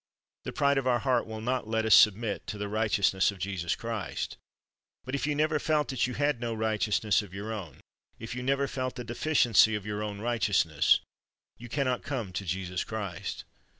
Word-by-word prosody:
The - - -3
pride 140 -2 +2
of 130 - -3
our 125 -1 +4
heart 125 -1 +1
will 110 0 -6
not 125 0 -1
let 110 0 0
us 110 - +5
submit 105 +4 +4
to 105 - -4
the 105 0 -3
righteous 105 -2 +2
ness 95 0 +3
of 100 - -5
Jesus 90 -2 -2
Christ. 115 -4 -4 0.7
But 130 - -6
if 140 +1 -1
you 150 - 0
never 155 +1 +1
felt 150 0 +1
that 130 -3 0
you 125 - -5
had 145 -3 +1
no 115 -1 -2
righteousness 110 -1 +1
of 100 -3 -11
your 105 +3 -4
own, 90 -10 -8 0.4
if 110 +1 -7
you 125 - -4
never 140 +2 +1
felt 130 -1 -3
the 125 - -5
deficiency 120 -3 +3
of 105 -1 -5
your 105 0 -3
own 105 -1 -4
righteous 110 -5 +2
ness, 80 -3 +3 0.6
you 120 +1 -9
can 140 +3 0
not 125 -1 0
come 120 -10 -4
to 95 +3 -4
Jesus 90 +1 -2
Christ. 100 -6 -5
110 Hz, 210 wpm, -29 LUFS, 100-130 Hz, 0.7 s, us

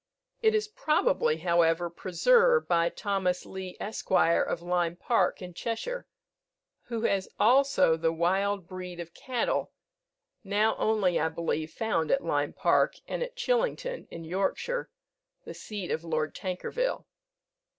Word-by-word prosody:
It 440 -1 +4
is 425 0 +1
probably, 465 +6 +1
however, 170 0 +2
preserved 470 - +3
by 170 0 +3
Thomas 190 -3 -1
Leigh, 190 -1 -7
Esq. 215 - -6
of 170 -1 +2
Lyme 175 -1 0
Park, 230 0 +1
in 180 -1 -8
Cheshire, 235 - -4 0.8
who 230 -2 -4
has 195 -4 0
also 255 -7 +4
the 165 0 +1
wild 190 +3 0
breed 180 -1 -7
of 170 -1 -7
cattle, 260 - -1 0.7
now 210 +2 +2
only, 205 -5 +2
I 160 - +1
believe, 160 -1 -2
found 210 -8 -1
at 275 - +2
Lyme - - 0
Park, - - +2
and - - -3
at - - -4
Chillington, - - -1
in 165 - -8
Yorkshire, 195 - -2 0.6
the - - -7
seat 205 -5 -6
of 160 - -2
Lord 155 -2 -1
Tankerville. 200 - -3
195 Hz, 135 wpm, -28 LUFS, 170-275 Hz, 0.8 s, It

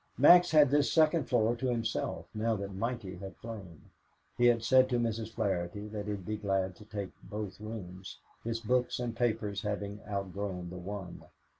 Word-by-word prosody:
Max 175 +6 +8
had 150 -4 +6
this 145 0 +3
second 160 -1 +4
floor 120 -2 +2
to 130 +2 -2
himself 115 -2 -1
now 110 +1 +1
that 100 -1 -5
Mikey 100 -3 -3
had 95 +1 -8
flown. 100 -8 -9 0.4
He 120 - +4
had 115 -1 +3
said 130 +1 +5
to 125 - +1
Mrs. 115 -1 -2
Flaherty 95 0 -2
that 105 -1 -5
he'd 100 -3 -4
be 110 +2 -2
glad 95 -2 0
to 105 - -13
take 100 -3 -5
both 105 -2 -6
rooms, 95 -4 -7 0.3
his 115 0 -2
books 125 +2 +1
and 120 -2 -3
papers 110 -4 0
having 105 -1 -3
outgrown 95 -2 -3
the 90 - -6
one. 95 -1 -6
105 Hz, 175 wpm, -31 LUFS, 100-120 Hz, 0.4 s, Max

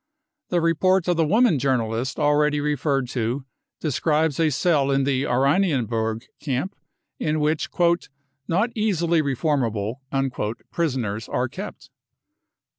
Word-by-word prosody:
* - - -60
The 175 -1 +1
report 175 +3 +2
of 175 - +3
the 165 -2 +2
woman 215 - +4
journalist 125 -1 0
already 150 0 +2
referred 145 -2 0
to 125 +2 -2 0.3
describes 155 0 +1
a 160 -1 +4
cell 145 -1 +2
in 135 0 +2
the 135 -1 +1
Oranienburg 125 - +1 0.2
camp, 140 +8 -2 0.4
in 155 0 0
which 150 +1 0
<e 170 -1 +5 0.5
not 200 +8 +1
easily 170 -7 +1
reformable 125 -6 -1 0.7
" - - -52
prisoners 120 -10 -2
are 125 +1 0
kept. - - -9
145 Hz, 125 wpm, -23 LUFS, 130-165 Hz, 0.7 s, <e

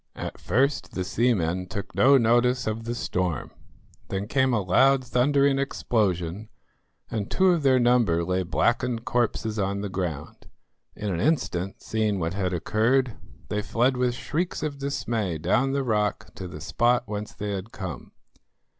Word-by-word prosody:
At - - -6
first 135 +9 0
the 95 - -2
seamen 90 -4 0
took 100 +1 -6
no 135 +2 +6
notice 125 +1 +3
of 110 +1 -3
the 120 +1 -3
storm; 90 - -2 0.6
then 95 +1 -3
came 130 +1 +2
a 120 - +2
loud, 130 +9 +4
thundering 135 +3 +2
explosion, 105 -7 -1 0.6
and 105 -3 -3
two 190 0 +3
of 170 -3 +1
their 130 -2 +4
number 120 -9 +3
lay 90 +2 0
blackened 120 +6 0
corpses 110 -3 0
on 100 0 -1
the 100 - -3
ground. 85 -5 -5 0.5
In 105 -3 -3
an 85 - -2
instant, 95 - -1
seeing 110 -2 0
what 85 -1 -2
had 95 -2 -1
occurred, 110 +8 +1 0.4
they 105 - -1
fled 120 +5 +1
with 125 -1 0
shrieks 160 +5 -3
of 145 -2 -3
dismay 115 - -2
down 100 - +1
the 140 0 0
rock 105 -4 -1
to 95 - -7
the 75 -3 -9
spot 120 - +2
whence 105 0 -5
they 105 -1 -4
had 100 +3 -5
come. 85 - -7
110 Hz, 160 wpm, -25 LUFS, 95-125 Hz, 0.6 s, no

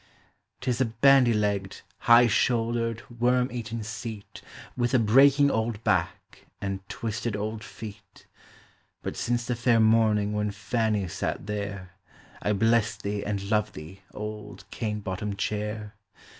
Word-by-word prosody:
>T 130 -1 0
is 125 - -1
a - - +4
bandy 125 +2 +5
legged, 100 -3 -1 0.3
high 120 +1 +9
shouldered, 115 0 +1 0.2
worm 125 +1 +3
eateu 115 -3 -5
seat, 110 -2 -7 0.3
With 120 +1 +1
a - - +7
breaking 135 +5 +5
old 110 -1 -2
back, 95 -5 -2
and 95 -1 -3
twisted 115 -1 -3
old 105 +1 -4
feet; 105 -2 -11 0.8
But - - -4
since 120 0 -1
the 125 - -1
fair 115 0 +3
morning 110 -2 +3
when 105 0 0
Fanny 105 -1 -1
sat 85 - -3
there, 100 -3 -5 0.5
I 105 - 0
bless 115 +1 +2
thee 100 +1 -3
and 100 0 -3
love 105 -1 +1
thee, 85 +6 -10
old 105 0 -7
cane 105 -2 -3
bottomed 100 +1 -4
chair. 105 +1 -3
110 Hz, 140 wpm, -27 LUFS, 105-115 Hz, 0.8 s, high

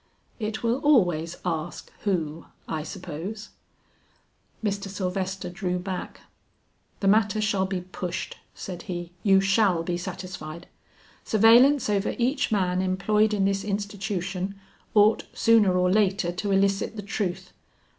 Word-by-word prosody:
"It 220 0 -3
will 235 +3 +1
always 175 - +2
ask 165 -1 -3
who, 165 -5 -1 0.2
I 155 - -2
suppose." 180 +5 -7 1.1
Mr. 200 -2 -1
Sylvester 190 0 -3
drew 180 0 -2
back. 185 0 -5 0.8
"The 195 - +1
matter 215 +1 +3
shall 205 -3 +1
be 190 -1 -2
pushed," 180 -1 -5 0.2
said 180 -2 -7
he; 175 -1 -4
"you 195 -2 +5
shall 195 -3 +3
be 175 +1 -2
satisfied. 175 -2 -7 0.6
Surveillance 235 +6 +5
over 205 -1 0
each 260 +3 +1
man 185 -3 +1
employed 210 +3 +2
in 200 -2 +1
this 195 0 0
institution 195 -2 -3 0.4
ought 210 +1 +5
sooner 215 -5 +4
or 180 0 +3
later 195 -3 +2
to 190 +3 -3
elicit 195 +2 +1
the 210 - -6
truth. 190 -2 -3
195 Hz, 125 wpm, -26 LUFS, 180-210 Hz, 1.1 s, you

